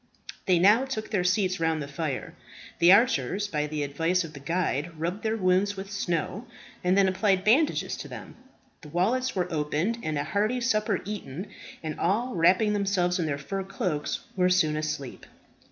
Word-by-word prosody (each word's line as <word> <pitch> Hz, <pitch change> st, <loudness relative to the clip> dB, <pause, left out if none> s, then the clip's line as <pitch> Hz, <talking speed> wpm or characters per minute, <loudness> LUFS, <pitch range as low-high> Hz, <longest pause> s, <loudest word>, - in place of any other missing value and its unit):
They 185 Hz, -2 st, +5 dB
now 210 Hz, +9 st, +5 dB
took 220 Hz, -6 st, -5 dB
their 195 Hz, -5 st, +1 dB
seats 185 Hz, 0 st, +1 dB
round 160 Hz, -1 st, +1 dB
the 140 Hz, -, -5 dB
fire. 140 Hz, -2 st, -4 dB, 0.5 s
The 170 Hz, +1 st, +7 dB
archers, 200 Hz, -, +3 dB
by 150 Hz, -5 st, -1 dB
the 150 Hz, -1 st, -2 dB
advice 165 Hz, +6 st, 0 dB
of 160 Hz, -2 st, -9 dB
the 140 Hz, -, -9 dB
guide, 165 Hz, 0 st, -2 dB
rubbed 175 Hz, +6 st, -2 dB
their 220 Hz, 0 st, -1 dB
wounds 190 Hz, +1 st, +2 dB
with 195 Hz, +1 st, -7 dB
snow, 190 Hz, +3 st, -2 dB, 0.4 s
and 180 Hz, +2 st, +3 dB
then 195 Hz, -1 st, +5 dB
applied 190 Hz, 0 st, +1 dB
bandages 270 Hz, +9 st, +2 dB
to -, -, -7 dB
them. -, -, -9 dB, 0.5 s
The 150 Hz, -, -11 dB
wallets 225 Hz, -, 0 dB
were 180 Hz, -2 st, -1 dB
opened, 155 Hz, +9 st, -1 dB
and 155 Hz, -5 st, -2 dB
a 145 Hz, -, 0 dB
hearty 205 Hz, +10 st, 0 dB
supper 215 Hz, -4 st, +1 dB
eaten; 195 Hz, -3 st, -6 dB, 0.3 s
and 155 Hz, -1 st, -5 dB
all, 230 Hz, +8 st, 0 dB
wrapping 185 Hz, +5 st, +3 dB
themselves 195 Hz, -3 st, +1 dB
in 165 Hz, -, 0 dB
their 140 Hz, -2 st, -1 dB
fur 195 Hz, +8 st, -4 dB
cloaks, 185 Hz, -6 st, -3 dB
were 180 Hz, -1 st, +3 dB
soon 160 Hz, -4 st, +3 dB
asleep. 155 Hz, -4 st, -4 dB
185 Hz, 180 wpm, -27 LUFS, 155-205 Hz, 0.5 s, The